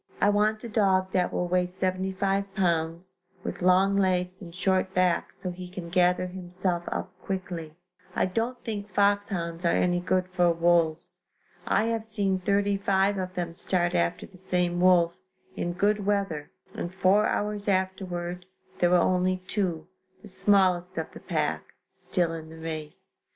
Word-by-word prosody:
I 205 - +4
want 215 +1 +1
a - - -4
dog 190 -4 +2
that 180 -1 +1
will 180 - -1
weigh 180 0 +1
75 190 +2 -1
pounds, 170 0 -1 0.3
with - - -5
long 185 +2 +4
legs 185 -1 +1
and 175 -3 -9
short 185 +1 0
back 180 -2 +2
so 180 - -5
he 180 0 -8
can 180 -2 -7
gather 180 0 +3
himself 180 -1 -3
up - - -3
quickly. 175 -5 -5 0.4
I - - +2
don't 230 +6 -2
think 210 -2 -4
foxhounds 195 -4 0
are 170 - +3
any 175 0 +2
good 185 +1 0
for 180 -1 +3
wolves. 170 +1 +1 0.5
I - - +3
have 225 -1 -1
seen 200 -4 0
thirty 200 +1 +1
five 195 0 +2
of 185 0 -4
them 175 -2 -3
start 175 0 0
after 85 0 0
the 185 - -17
same 180 -1 0
wolf, 175 -2 +5 0.4
in 175 - -2
good 205 +3 +1
weather 195 -7 -1 0.2
and 175 - -4
four 190 +3 +3
hours 210 0 -2
afterward 180 -2 -2 0.3
there 175 - +4
were 180 - +4
only 185 +1 +1
two, 175 -6 -2 0.4
the - - -10
smallest 185 -2 +3
of - - -3
the - - -10
pack, - - -1 0.2
still 175 -3 -1
in 160 -1 -7
the 160 - -11
race. 160 -2 -7
185 Hz, 160 wpm, -27 LUFS, 175-195 Hz, 0.5 s, wolf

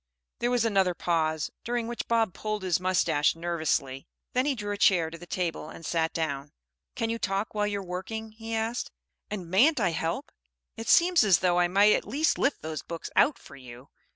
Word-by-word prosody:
There 240 - +1
was 245 -2 +2
another 195 -5 +2
pause, 160 -3 0
during 240 0 -1
which 240 0 -5
Bob 225 -5 +2
pulled 215 -2 -4
his 180 -3 +1
moustache 170 -5 +2
nervously! 155 -6 -2 0.3
Then 255 +3 +1
he 285 - +1
drew 205 -3 -4
a - - -4
chair 170 -5 +4
to 165 - -8
the 175 - -11
table 170 -4 -3
and 165 - -10
sat 165 0 0
down. 145 -2 -3 0.4
"Can 230 -3 -1
you 230 - -3
talk 195 +1 -2
while 210 -1 0
you're 200 -1 -3
working?" 220 +5 -5
he 225 +1 -6
asked. 225 +2 -2 0.4
"And 190 -5 -5
mayn't 255 +10 +5
I 195 - +2
help? 165 - -3 0.4
It 225 0 -6
seems 350 -1 +5
as 195 -5 +5
though 180 -1 +2
I 175 - +4
might 200 +4 +5
at - - -1
least 290 +9 +1
lift 280 - 0
those 155 -1 -4
books 170 -1 -7
out 295 - +4
for - - -14
you. 125 0 -12
190 Hz, 205 wpm, -28 LUFS, 165-225 Hz, 0.4 s, mayn't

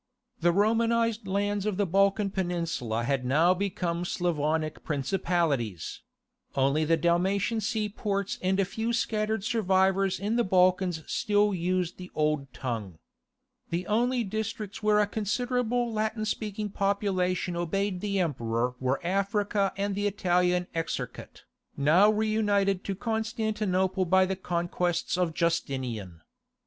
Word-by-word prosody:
The 175 +1 +3
Romanized 230 +2 +2
lands 205 +1 0
of 205 -3 -1
the 205 - +2
Balkan 195 +2 +2
peninsula 165 - -2
had 135 +1 0
now 155 +8 +4
become 180 -3 -2
Slavonic 160 -3 -1
principalities: 145 - -1 0.5
only 140 +3 +2
the 165 +1 +3
Dalmatian 190 +7 +1
seaports 210 -2 -2
and 190 +1 +1
a 195 - +3
few 225 +5 -2
scattered 215 -2 0
survivors 190 -3 +2
in 210 +4 -1
the 240 - +3
Balkans 185 -3 +2
still 205 0 +1
used 180 0 -1
the 180 0 -9
old 150 -3 0
tongue. 110 -11 -5 0.7
The 175 +2 -2
only 240 +4 +1
districts 215 0 -4
where 210 -1 +3
a 210 - +4
considerable 240 +3 -1
Latin 215 0 -1
speaking 210 -1 -3
population 190 -3 0
obeyed 180 +2 -1
the 200 -1 -1
Emperor 125 -7 -1
were 130 +1 0
Africa 200 +1 +1
and 200 0 -1
the 205 +1 0
Italian 180 -2 +1
Exarchate, 165 0 -5 0.3
now 165 +9 +5
reunited 210 -3 +1
to 195 - -2
Constantinople 215 -4 -1
by 190 +2 +4
the 190 +1 -2
conquests 175 -1 -1
of 175 -3 0
Justinian. 125 - -2
190 Hz, 125 wpm, -28 LUFS, 170-210 Hz, 0.7 s, now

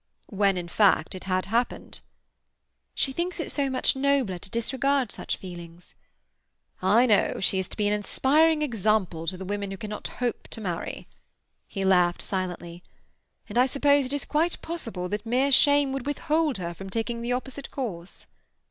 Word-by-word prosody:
"When, 195 -2 +2
in 175 -1 -4
fact, 185 -3 +3
it 185 - -8
had 185 -1 0
happened?" 235 +4 -2 1.0
"She 270 - 0
thinks 345 +5 -3
it 325 - -3
so 280 -2 0
much 260 0 +1
nobler 265 -9 +1
to 190 - -9
disregard 265 +2 0
such - - -4
feelings." 175 -2 -10 0.9
"I 210 +7 +5
know. 215 -5 +3
She 190 0 +3
is 190 - -2
to - - -9
be 210 -1 +1
an 205 - +2
inspiring 300 +9 +3
example 215 - 0
to 185 +2 -1
the 190 - -7
women 200 +1 -3
who 195 - -6
cannot 210 +1 -5
hope 245 -2 -3
to - - -6
marry." 180 -6 -4 0.6
He 195 -2 -3
laughed 180 -2 +3
silently. 175 -2 -4 0.7
"And 240 - 0
I 255 - +5
suppose 285 0 +3
it 265 - -6
is 285 - -1
quite 325 +3 0
possible 230 - -4
that 210 +1 -3
mere 255 +5 +1
shame 285 0 +5
would 270 0 -4
withhold 300 -1 +1
her 170 -2 -4
from 195 +2 -9
taking 230 +3 -2
the 240 +1 -1
opposite 265 +2 -5
course." 195 -10 -6
225 Hz, 175 wpm, -26 LUFS, 190-275 Hz, 1.0 s, I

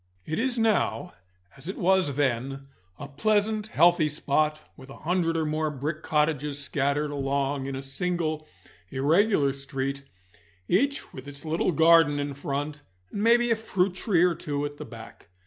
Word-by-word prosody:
It 155 - -2
is 255 +1 0
now 220 -5 +1 0.4
as 135 +4 -11
it 190 - -5
was 185 -6 +2
then, 135 0 -1 0.3
a 145 - -7
pleasant, 215 +7 0
healthy 170 -4 +4
spot, 150 +1 0 0.2
with 130 -1 -14
a 135 - -10
hundred 165 -1 0
or 160 - 0
more 155 0 0
brick 150 +2 -4
cottages 150 -2 0
scattered 145 +1 -1
along 140 -1 -1
in 135 - -4
a 135 - -5
single 155 +2 -2 0.4
irregular 150 +2 +2
street, 140 0 -4 0.7
each 280 +10 0
with 130 +1 -9
its 145 +2 -9
little 160 +3 +1
garden 160 -1 +5
in 145 0 -3
front, 145 +2 -4 0.3
and 200 - -3
maybe 240 +2 +4
a - - +5
fruit 195 -4 0
tree 180 -2 +2
or 180 -1 +4
two 145 -3 -3
at 145 0 -6
the 150 - -7
back. 115 -4 -12
150 Hz, 165 wpm, -26 LUFS, 140-180 Hz, 0.7 s, garden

